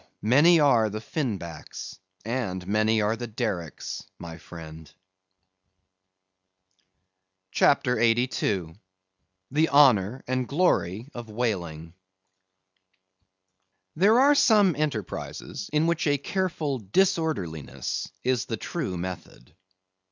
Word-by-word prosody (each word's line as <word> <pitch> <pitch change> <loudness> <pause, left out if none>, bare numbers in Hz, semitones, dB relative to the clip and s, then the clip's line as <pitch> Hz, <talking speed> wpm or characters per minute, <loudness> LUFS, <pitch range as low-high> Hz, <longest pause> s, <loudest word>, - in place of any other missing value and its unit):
many 150 +10 +5
are 120 -7 +4
the 105 +1 -5
Fin 120 -2 -2
Backs, 85 +1 -9 0.3
and 110 -7 -3
many 110 +2 +2
are 105 +2 +1
the 120 +1 -6
Dericks, 105 -8 -4
my 85 0 -9
friend. 80 -2 -11 2.6
CHAPTER 125 -4 +3
82. 115 -7 +1 0.8
The 155 +4 +2
Honor 130 -5 +4
and 130 -1 -1
Glory 130 - +1
of 120 -2 -8
Whaling. 85 -8 -3 2.0
There 210 +8 +5
are 280 +2 +6
some 215 - +4
enterprises 140 - -4
in 150 +1 +2
which 170 -1 0
a 145 -1 +3
careful 155 -3 -2
disorderliness 95 - -1
is 125 -3 0
the - - -4
true 90 - -4
method. 85 -7 -8
115 Hz, 100 wpm, -26 LUFS, 95-150 Hz, 2.6 s, are